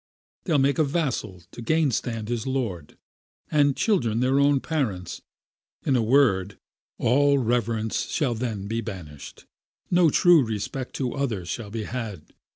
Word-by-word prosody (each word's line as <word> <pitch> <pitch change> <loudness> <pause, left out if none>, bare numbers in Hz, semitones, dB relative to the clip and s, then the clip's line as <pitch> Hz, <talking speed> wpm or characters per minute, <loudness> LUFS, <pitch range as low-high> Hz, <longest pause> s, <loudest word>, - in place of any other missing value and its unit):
They'll 165 -5 +2
make 140 +3 +2
a - - +5
vassal 135 - -2
to - - -9
gain 155 +3 +2
stand 115 -3 -3
his 120 +1 -3
lord, 110 - -3 0.5
And 145 -2 +3
children 120 - +1
their 130 +2 +2
own 140 0 +4
parents; 120 - -3 0.6
in 135 - +2
a 120 - +3
word, 110 -6 +2 0.4
All 140 +4 +3
reverence 115 -3 -1
shall 135 -6 0
then 110 -4 -4
be 115 +3 -2
banished, 80 -9 -9 0.5
No 175 -2 +5
true 170 0 +5
respect 115 +4 -4
to 125 -3 -2
other 120 -10 -2
shall 105 +4 -5
be 110 +1 -4
had. 105 -8 -6
120 Hz, 150 wpm, -25 LUFS, 110-140 Hz, 0.6 s, a